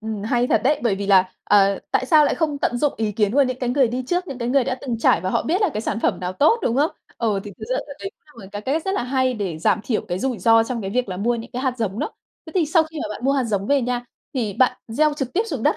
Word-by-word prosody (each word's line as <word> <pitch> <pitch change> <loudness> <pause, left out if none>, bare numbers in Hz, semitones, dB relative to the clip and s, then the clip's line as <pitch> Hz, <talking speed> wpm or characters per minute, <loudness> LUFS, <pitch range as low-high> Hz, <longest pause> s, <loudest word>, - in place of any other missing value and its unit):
ừm, 220 -2 -5
hay 245 +2 +1
thật - - +2
đấy, 295 +4 +2
bởi 230 -5 +2
vì 200 +1 -4
là, 190 -2 +4
ờ, 200 -1 +4
tại 260 - +1
sao 300 +2 +6
lại - - +1
không 305 -4 -1
tận 245 - 0
dụng 295 +2 +1
ý 215 -2 -1
kiến 210 -1 +1
của 285 - +6
những 255 -1 -2
cái 250 - -2
người 260 -1 +3
đi 250 +2 -3
trước, 355 +5 -1
những 270 - -6
cái 235 -1 -2
người 265 0 +3
đã 255 - -1
từng 240 -4 -3
trải - - +3
và 185 - -2
họ - - +1
biết 360 +6 0
là 405 - +4
cái 215 - -1
sản 220 0 -3
phẩm - - 0
nào 180 0 -3
tốt, 310 - +3
đúng 235 - 0
không? 295 +4 +3 0.3
Ờ, 215 -4 0
thì 205 - -7
thực 220 - -6
ra 255 - +1
đ - - -11
đấy 390 - -5
cũng 300 - -18
là - - -11
một 190 - -11
cái 205 - -4
cách 300 +6 -1
rất 385 - -1
là - - 0
hay 260 0 +1
để 190 -7 -3
giảm 170 - +2
thiểu 225 - 0
cái 175 - -2
rủi 250 +1 -2
ro 225 +4 +5
trong 235 0 -3
cái 195 -2 -4
việc 245 +1 -1
là 185 - -4
mua 235 +5 +1
những 230 +1 -7
cái 255 +1 -3
hạt 255 -2 0
giống 215 -2 -2
đó. - - -2 0.4
Thế 320 - -10
thì 350 -5 +2
sau 320 +2 +4
khi 315 0 -8
mà - - -4
bạn 235 - -9
mua 275 - +3
hạt 270 -2 +1
giống 200 -4 -1
về 280 +1 +2
nha, 245 0 -2 0.3
thì 225 -6 -1
bạn 255 +6 +2
gieo 300 +6 +2
trực 270 -4 -4
tiếp 405 - +2
xuống - - -4
đất - - +2
245 Hz, 330 wpm, -22 LUFS, 210-280 Hz, 0.4 s, sao